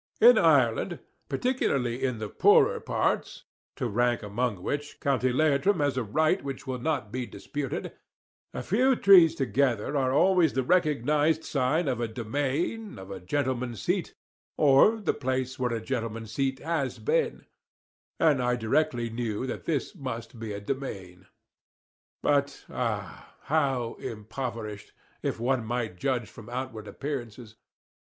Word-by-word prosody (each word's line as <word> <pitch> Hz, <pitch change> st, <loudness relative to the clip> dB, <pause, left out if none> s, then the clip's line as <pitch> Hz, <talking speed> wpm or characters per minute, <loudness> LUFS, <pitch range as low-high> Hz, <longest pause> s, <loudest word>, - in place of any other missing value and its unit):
In 480 Hz, +3 st, +8 dB
Ireland, -, -, +3 dB, 0.3 s
particularly 135 Hz, -, 0 dB
in 125 Hz, -3 st, 0 dB
the 110 Hz, -1 st, -4 dB
poorer -, -, +4 dB
parts -, -, -1 dB, 0.3 s
to 125 Hz, -, -2 dB
rank 120 Hz, +1 st, +1 dB
among 105 Hz, -2 st, -2 dB
which, 145 Hz, 0 st, -4 dB
County 130 Hz, -2 st, +1 dB
Leitrim 155 Hz, +7 st, +2 dB
has 145 Hz, -3 st, +1 dB
a 130 Hz, -, 0 dB
right 155 Hz, -, +1 dB
which 135 Hz, -1 st, -6 dB
will 130 Hz, -2 st, -3 dB
not 135 Hz, -6 st, -2 dB
be 125 Hz, 0 st, -3 dB
disputed 145 Hz, -3 st, -5 dB, 0.6 s
a -, -, -5 dB
few 255 Hz, +7 st, +3 dB
trees 185 Hz, -7 st, +7 dB
together 130 Hz, -1 st, 0 dB
are 130 Hz, -2 st, +2 dB
always 175 Hz, +2 st, +4 dB
the 130 Hz, -, 0 dB
recognised 150 Hz, 0 st, +2 dB
sign 145 Hz, +4 st, 0 dB
of 125 Hz, -3 st, -1 dB
a 120 Hz, -, 0 dB
demesne, 145 Hz, -, -2 dB
of 95 Hz, +1 st, -9 dB
a 95 Hz, -, -6 dB
gentleman's 125 Hz, +2 st, -2 dB
seat, -, -, -1 dB, 0.4 s
or 150 Hz, +10 st, +5 dB
the 205 Hz, -, 0 dB
place 130 Hz, -1 st, -2 dB
where 125 Hz, -1 st, 0 dB
a 115 Hz, -, -1 dB
gentleman's 115 Hz, -2 st, -4 dB
seat 135 Hz, +3 st, -1 dB
has 155 Hz, -5 st, -1 dB
been; 470 Hz, 0 st, 0 dB, 0.7 s
and 150 Hz, -5 st, +4 dB
I 125 Hz, 0 st, +1 dB
directly 120 Hz, 0 st, 0 dB
knew 115 Hz, 0 st, -2 dB
that 130 Hz, -, -5 dB
this 150 Hz, -5 st, -1 dB
must 120 Hz, -3 st, -6 dB
be 110 Hz, -2 st, -5 dB
a 100 Hz, -, -4 dB
demesne. 95 Hz, -7 st, -6 dB, 1.0 s
But 140 Hz, -1 st, +1 dB
ah! -, -, -4 dB
how 135 Hz, -6 st, 0 dB
impoverished, 110 Hz, -1 st, -6 dB, 0.3 s
if -, -, -2 dB
one 125 Hz, 0 st, +1 dB
might 115 Hz, -5 st, -3 dB
judge 125 Hz, -3 st, 0 dB
from 115 Hz, 0 st, -12 dB
outward 120 Hz, -4 st, -5 dB
appearances. 120 Hz, -2 st, -6 dB
130 Hz, 145 wpm, -28 LUFS, 115-145 Hz, 1.0 s, In